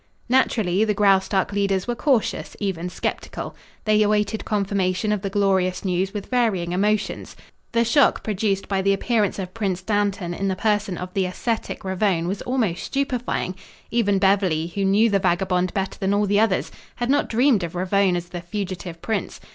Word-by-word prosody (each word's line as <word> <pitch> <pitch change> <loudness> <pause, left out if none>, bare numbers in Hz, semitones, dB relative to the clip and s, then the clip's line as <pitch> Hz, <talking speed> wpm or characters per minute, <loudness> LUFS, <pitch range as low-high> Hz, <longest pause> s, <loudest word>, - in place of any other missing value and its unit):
Naturally 220 -7 +2
the 215 -1 +1
Graustark 195 -1 +3
leaders 195 -1 0
were 240 - 0
cautious, 250 -2 0
even 180 -4 -2
skeptical. - - -4 0.3
They 215 0 +4
awaited 210 +1 +1
confirmation 200 -1 0
of 210 -2 0
the 195 - -2
glorious 190 -2 +1
news 185 +1 0
with 205 -2 -5
varying 215 -9 0
emotions. 210 +3 -1 0.4
The 235 0 +2
shock 275 +4 +3
produced 200 -2 -1
by 195 -1 0
the 195 +1 +3
appearance 210 0 0
of 185 -2 -5
Prince 190 -4 -2
Dantan 200 -3 0
in 195 +3 -2
the 190 - 0
person 205 -2 0
of 180 0 -6
the 190 -2 +1
ascetic 225 +5 -3
Ravone 190 -3 0
was 195 +2 -3
almost 225 -10 -1
stupefying. 250 -8 -2 0.4
Even 205 -4 +2
Beverly, 190 -5 +2
who 200 -1 0
knew 205 +4 +4
the 200 -3 +2
vagabond 185 0 +1
better 195 -1 -2
than 195 0 +1
all 205 0 +2
the 205 +1 +2
others, 220 -4 +1 0.2
had 240 +1 -1
not 285 - +2
dreamed 235 -3 +3
of 170 +1 -5
Ravone 190 +1 +2
as 175 0 -4
the 175 -1 -6
fugitive 180 -2 -5
prince. 220 - -2
195 Hz, 175 wpm, -23 LUFS, 185-215 Hz, 0.4 s, They